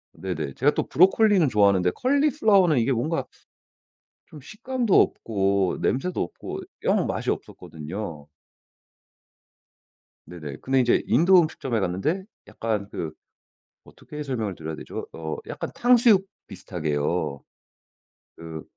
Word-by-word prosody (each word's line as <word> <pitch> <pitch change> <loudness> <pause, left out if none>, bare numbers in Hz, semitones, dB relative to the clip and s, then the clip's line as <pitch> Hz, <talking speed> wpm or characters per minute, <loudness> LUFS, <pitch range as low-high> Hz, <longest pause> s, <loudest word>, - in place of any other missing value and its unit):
네네. 80 -7 -4
제가 145 - +2
또 - - +1
브로콜리는 190 0 +4
좋아하는데 100 -5 +3
콜리플라워는 250 - +3
이게 120 +3 +2
뭔가 130 +7 -1 1.0
좀 150 - -12
식감도 230 - 0
없고 100 -3 0
냄새도 175 +8 -1
없고 85 - -6 0.2
영 - - +2
맛이 - - -2
없었거든요. 80 -1 -6 2.0
네네. 75 -5 -8
근데 135 0 +1
이제 120 -2 +3
인도 175 +10 +5
음식점에 135 -7 -2
갔는데 95 - -1 0.2
약간 110 -3 -3
그 80 - -4 0.7
어떻게 150 0 -9
설명을 115 -8 -3
드려야 80 -1 -6
되죠? - - -7
어 80 -1 -5
약간 - - -5
탕수육 235 -5 +5 0.2
비슷하게요. 75 -3 -3 0.9
그 80 -1 -8
115 Hz, 270 characters per minute, -24 LUFS, -, 2.0 s, 인도